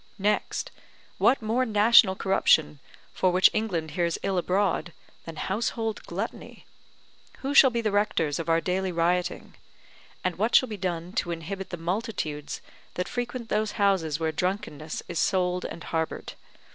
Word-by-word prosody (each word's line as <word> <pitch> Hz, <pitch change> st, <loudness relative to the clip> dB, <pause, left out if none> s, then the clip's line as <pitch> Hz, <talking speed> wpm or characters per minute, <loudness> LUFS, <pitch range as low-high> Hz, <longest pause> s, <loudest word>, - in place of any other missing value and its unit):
Next, 205 Hz, +1 st, -1 dB, 0.5 s
what 265 Hz, -, +3 dB
more 230 Hz, +4 st, +1 dB
national 210 Hz, -3 st, +5 dB
corruption, 160 Hz, -6 st, +2 dB, 0.3 s
for 185 Hz, -, +2 dB
which 185 Hz, +1 st, +5 dB
England 175 Hz, -8 st, -2 dB
hears 170 Hz, +1 st, 0 dB
ill 190 Hz, -2 st, +1 dB
abroad, 185 Hz, -1 st, 0 dB, 0.3 s
than 165 Hz, -, -7 dB
household 220 Hz, +5 st, -2 dB
gluttony: -, -, -6 dB, 0.8 s
who 275 Hz, +1 st, -2 dB
shall 275 Hz, -2 st, +8 dB
be 235 Hz, -1 st, -1 dB
the 215 Hz, -2 st, 0 dB
rectors 170 Hz, -8 st, +1 dB
of 165 Hz, -, -4 dB
our 165 Hz, 0 st, +3 dB
daily 185 Hz, +1 st, -1 dB
rioting? 175 Hz, +1 st, -1 dB, 0.7 s
And 185 Hz, -2 st, -1 dB
what 220 Hz, +3 st, +2 dB
shall 255 Hz, -, +5 dB
be 215 Hz, -, -4 dB
done 180 Hz, -2 st, -4 dB
to -, -, -9 dB
inhibit 175 Hz, +3 st, -5 dB
the 175 Hz, -, -5 dB
multitudes 170 Hz, -, -3 dB, 0.3 s
that 180 Hz, +1 st, -2 dB
frequent 245 Hz, -1 st, -4 dB
those 215 Hz, 0 st, 0 dB
houses 190 Hz, -8 st, +1 dB
where 160 Hz, -1 st, 0 dB
drunkenness 155 Hz, -3 st, -3 dB
is 170 Hz, -2 st, -3 dB
sold 180 Hz, -1 st, +1 dB
and 165 Hz, -, -7 dB
harboured? 160 Hz, -1 st, -3 dB
185 Hz, 150 wpm, -26 LUFS, 165-210 Hz, 0.8 s, shall